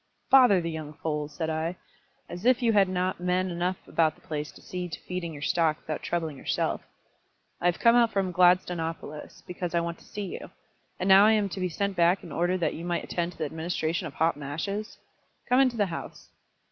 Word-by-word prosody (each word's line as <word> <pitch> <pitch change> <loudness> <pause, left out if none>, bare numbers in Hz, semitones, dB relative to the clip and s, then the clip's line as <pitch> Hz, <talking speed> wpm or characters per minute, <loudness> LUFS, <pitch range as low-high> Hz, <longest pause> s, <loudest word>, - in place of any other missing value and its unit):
"Bother 250 -8 +7
the 165 0 -3
young 155 -1 -6
foals!" 150 -1 -3
said 160 -2 -2
I. 160 +3 -2 0.5
"As 175 +2 -8
if 250 +1 +3
you 230 -1 +3
had 195 -2 +4
not 185 0 -1
men 180 +1 0
enough 175 +2 -1
about 160 -2 +2
the - - -24
place 150 -1 -4
to - - -14
see 180 -1 -5
to 160 - -6
feeding 180 -2 -4
your 145 -2 -8
stock 160 -2 +2
without 155 -1 -5
troubling 160 -4 -2
yourself. - - -1 0.8
I 175 - +2
have 175 - +2
come 235 0 +5
out 235 -2 +4
from 195 -3 0
Gladstonopolis, 175 -4 +1
because 175 -1 -4
I - - +4
want 170 0 -4
to - - -18
see 205 -1 -5
you; 185 - -7 0.5
and 185 - -1
now 195 +2 +8
I 220 - +5
am 210 -2 +1
to 195 - -6
be 185 -1 0
sent 200 +3 -2
back 175 +2 +3
in 165 - -10
order 175 +4 +1
that 170 - 0
you 165 - -7
might 175 0 -1
attend 175 0 -2
to - - -20
the 155 - -2
administration 165 +2 -2
of 145 - -11
hot 165 +1 +2
mashes! 170 +10 -4 0.5
Come 250 +1 +4
into 255 -3 +3
the 205 - +3
house." 170 -3 -8
175 Hz, 220 wpm, -27 LUFS, 160-190 Hz, 0.8 s, now